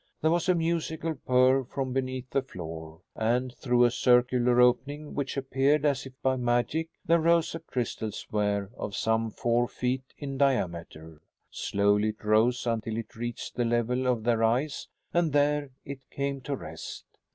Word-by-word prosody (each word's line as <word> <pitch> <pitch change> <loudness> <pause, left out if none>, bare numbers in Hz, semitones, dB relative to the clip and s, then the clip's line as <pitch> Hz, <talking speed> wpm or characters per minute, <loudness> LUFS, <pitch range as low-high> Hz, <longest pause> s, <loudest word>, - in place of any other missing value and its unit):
There 160 - +2
was 175 +2 +1
a 180 - +5
musical 165 -1 -1
purr 130 -1 +3
from 130 +1 -4
beneath 130 -1 -3
the 135 - +2
floor, 80 -8 -8
and, 120 +3 0
through 125 0 +3
a 120 - +3
circular 125 0 +3
opening 145 +5 +2
which 140 -1 -3
appeared 135 +2 +2
as 140 -2 +1
if 130 - -13
by 130 0 +2
magic, 125 +7 0 0.2
there 170 +1 +4
rose 170 0 +3
a 165 - -4
crystal 115 -5 -3
sphere 105 -1 -2
of 100 -5 -5
some 115 +1 +1
four 120 +2 +1
feet 130 +1 -3
in 135 -2 -5
diameter. 85 - -1 0.3
Slowly 105 +1 +1
it 110 +1 -8
rose 110 +4 +3
until 115 -1 -1
it 115 - -6
reached 120 +1 -5
the 120 - 0
level 120 +2 0
of 120 -3 +1
their 115 -1 +2
eyes 130 +6 0 0.3
and 170 -4 +2
there 145 0 +2 0.2
it 140 -1 -6
came 140 -1 -3
to 140 +2 -3
rest. - - -8
125 Hz, 165 wpm, -28 LUFS, 115-140 Hz, 0.3 s, a